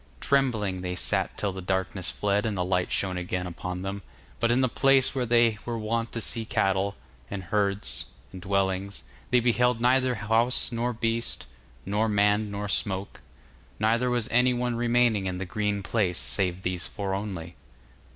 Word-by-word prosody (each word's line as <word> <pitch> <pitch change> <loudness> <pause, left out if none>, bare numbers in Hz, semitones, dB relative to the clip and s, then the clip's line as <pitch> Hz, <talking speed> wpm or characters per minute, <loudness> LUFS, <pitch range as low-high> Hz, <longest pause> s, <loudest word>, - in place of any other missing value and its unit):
Trembling 110 - +1
they 90 0 -3
sat - - 0
till 100 -2 -1
the 95 - -6
darkness 95 0 -1
fled 105 0 0
and 105 -3 -2
the 90 - 0
light 90 -1 0
shone 95 -2 0
again 90 0 -3
upon 90 +1 -5
them, 100 +1 -4 0.4
but 115 - +2
in 120 +2 +3
the 130 - +3
place 135 +1 +3
where 130 -3 -1
they 115 -2 +4
were 120 -1 -3
wont 115 +1 -2
to 115 - -2
see 115 +1 0
cattle, 95 -2 0 0.3
and 100 -2 -5
herds, 100 +2 0 0.3
and 95 - -8
dwellings, 100 0 -1 0.3
they 125 - +4
beheld 125 0 +2
neither 125 +1 +3
house 115 +4 +2
nor 120 +1 -1
beast, 115 0 -1 0.4
nor 105 +3 +1
man 105 +1 +2
nor 100 0 -4
smoke; 100 -1 -2 0.6
neither 115 +4 +2
was 120 -3 0
any 125 +1 +4
one 120 0 -1
remaining 120 -4 +2
in 90 -1 -3
the 95 - -4
green 105 +1 -1
place 95 -3 0
save 95 -2 -1
these 90 -1 -2
four 100 -2 -4
only. 95 -4 -5
105 Hz, 170 wpm, -27 LUFS, 95-115 Hz, 0.6 s, they